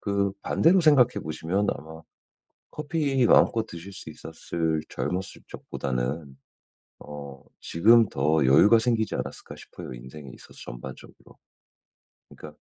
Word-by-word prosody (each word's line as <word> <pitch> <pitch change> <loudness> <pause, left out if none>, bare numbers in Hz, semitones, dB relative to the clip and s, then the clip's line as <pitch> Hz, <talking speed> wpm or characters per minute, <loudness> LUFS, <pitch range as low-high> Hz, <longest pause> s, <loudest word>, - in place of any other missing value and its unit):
그 100 -1 0
반대로 180 +3 +3
생각해 140 -6 +4
보시면 85 +6 -2
아마 80 +3 -12 0.7
커피 145 -4 -1
마음껏 115 -1 +4
드실 85 +1 -10
수 95 -4 -10
있었을 80 0 -3
젊었을 95 +1 -4
적보다는 65 +2 -4 0.6
어 70 -2 -10 0.2
지금 115 +6 +4
더 75 +1 +1
여유가 100 - +6
생기지 115 -2 0
않았을까 - - -6
싶어요 - - -10
인생에 65 +4 -11
있어서 - - -16
전반적으로. - - -11 0.9
그니까 75 -1 -12
85 Hz, 290 characters per minute, -26 LUFS, 75-115 Hz, 0.9 s, 여유가